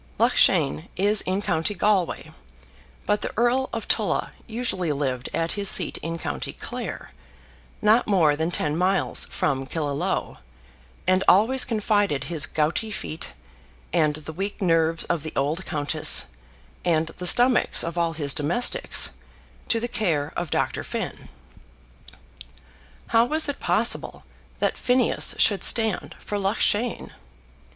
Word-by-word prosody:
Loughshane 75 +2 +2
is 205 +3 +2
in 190 +2 -1
county 180 +1 -1
Galway, 195 -3 0 0.7
but 210 0 0
the - - -4
Earl 245 +3 +1
of - - -5
Tulla - - -1 0.2
usually 220 -8 -2
lived 135 -3 -3
at 165 0 -2
his 200 -1 +1
seat 180 - +3
in 165 +1 -5
county - - -5
Clare, - - -7 0.7
not 220 +3 +4
more 170 -8 +3
than 160 +2 -2
ten 150 -4 -1
miles 185 +3 +1
from 135 -2 -2
Killaloe, 155 +4 -3 0.7
and 185 +1 +2
always 235 +7 +5
confided 205 - 0
his 160 -3 0
gouty 160 +8 -1
feet, 165 -6 -6 0.6
and 155 -4 +2
the 155 +1 -8
weak 195 +5 -5
nerves 165 -3 +1
of 170 -3 -2
the 155 +1 -7
old 150 +7 -2
countess, 150 - +3 0.6
and 165 -2 +1
the 180 - -1
stomachs 245 +5 +5
of 170 0 -5
all 170 -1 0
his 145 -3 0
domestics, 170 +12 +3 0.6
to 230 - +2
the 240 - -3
care 165 -11 -2
of 175 -2 -3
Dr. - - -2
Finn. - - -6 1.8
How 230 0 +4
was 310 +5 -1
it 285 - -4
possible - - 0 0.3
that - - -1
Phineas 250 -1 +1
should 205 -3 +2
stand 215 -9 +3
for 205 - -5
Loughshane? 210 +3 -1
180 Hz, 135 wpm, -24 LUFS, 155-210 Hz, 1.8 s, always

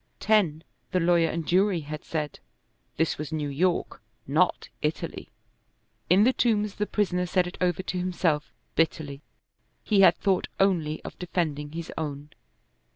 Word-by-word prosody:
Ten, 180 -8 +2 0.3
the 185 - +3
lawyer 170 -1 +4
and 165 -1 -3
jury 185 -1 +3
had 150 +1 -7
said: 150 -3 -4 0.6
this 160 -1 0
was 150 +1 -5
New 150 -2 -2
York, 170 +1 0 0.2
not 160 +6 +1
Italy. 150 +1 -3 0.8
In 185 +4 +6
the 255 +3 +4
Tombs 210 -5 +1
the 210 0 -2
prisoner 180 -3 0
said 180 0 +2
it 180 - -8
over 180 0 +1
to 185 -1 -3
himself, 175 -4 0 0.2
bitterly. 150 -3 0 0.6
He 205 -3 +3
had 175 -3 +7
thought 195 -3 +1
only 165 -6 +1
of - - -9
defending 155 -5 -2
his 165 0 -5
own. 145 -1 -5
170 Hz, 150 wpm, -27 LUFS, 155-185 Hz, 0.8 s, had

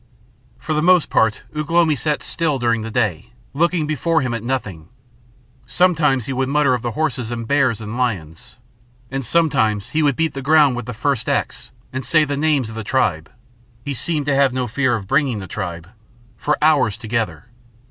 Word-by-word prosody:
For 155 - -4
the 150 - +1
most 180 0 +4
part 110 -1 +2
Ugh 150 -1 -3
lomi 165 -2 +3
sat 150 +2 -1
still 160 -4 -1
during 120 -2 0
the 110 - -5
day, 105 -8 -1 0.2
looking 170 +2 +1
before 160 +2 0
him 125 -3 -2
at 115 -2 -4
nothing, 105 -11 -4 0.8
sometimes 155 -9 +2
he 135 - -3
would 130 +1 -1
mutter 145 -2 +3
of 125 - -1
the 120 -1 -3
horses 125 -6 -2
and 115 -1 -5
bears 130 -5 +2
and 110 +1 -6
lions, 95 -11 -3 0.6
and 135 0 -3
sometimes 110 -9 +1
he 160 - 0
would 145 -3 +2
beat 160 +2 0
the 135 - -5
ground 145 -1 +4
with 120 -2 -6
the 125 - -5
first 140 0 -1
axe - - -2 0.2
and 130 0 -3
say 155 +5 +3
the 145 0 -2
names 145 -4 +1
of 110 - -9
the 110 - -5
tribe 100 - 0 0.6
he 140 - -2
seemed 150 +3 -1
to 145 - +1
have 135 -1 +3
no 130 -1 -1
fear 125 +2 0
of 105 -4 -5
bringing 140 -3 +1
the 95 - -6
tribe 85 -4 -6 0.5
for 150 +6 -1
hours 135 -10 +3
together. 110 -6 -3
130 Hz, 195 wpm, -20 LUFS, 110-150 Hz, 0.8 s, most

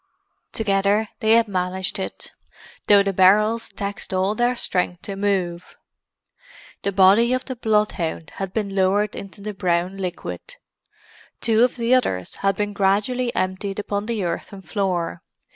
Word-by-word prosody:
Together 200 0 +1
they 220 0 +3
had 230 0 +5
managed 185 0 -2
it, 190 - -6 0.6
though 200 -1 +7
the 195 0 -1
barrels 210 +5 +4
taxed 200 -1 -5
all 190 +2 +1
their 240 +3 +1
strength 180 -5 -1
to 200 - -5
move. 190 -3 -2 1.1
The 200 - -1
body 200 +6 +5
of 255 - -1
the 260 - -5
bloodhound 210 -8 -1
had 195 -1 -4
been 200 -1 -2
lowered 195 +2 +2
into 200 +1 -9
the 210 +1 -5
brown 180 -1 0
liquid; 190 - -6 0.8
two 225 0 +3
of 250 - +2
the 235 +1 +1
others 95 - 0
had 195 -1 +1
been 205 +1 -2
gradually 210 +6 +1
emptied 190 +1 -2
upon 205 0 -3
the 225 -4 -1
earthen 190 +2 -4
floor. 175 - -2
200 Hz, 145 wpm, -22 LUFS, 185-215 Hz, 1.1 s, though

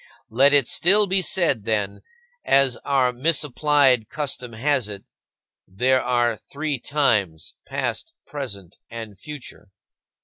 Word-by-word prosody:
Let 135 +5 +4
it 140 -4 +4
still 205 +4 +3
be 190 0 +2
said, 165 - +1
then, 105 -3 -2 0.4
as 135 -2 +3
our 130 -3 +1
misapplied 140 -3 +2
custom 135 -5 -4
has 130 -1 0
it: 100 -1 -8 0.6
"There 130 +7 +1
are 120 -2 +1
three 145 -1 -3
times, 105 - 0 0.2
past, 330 0 -4
present, 100 - -7
and 115 -3 -8
future." 140 -1 -11
130 Hz, 115 wpm, -22 LUFS, 110-145 Hz, 0.6 s, Let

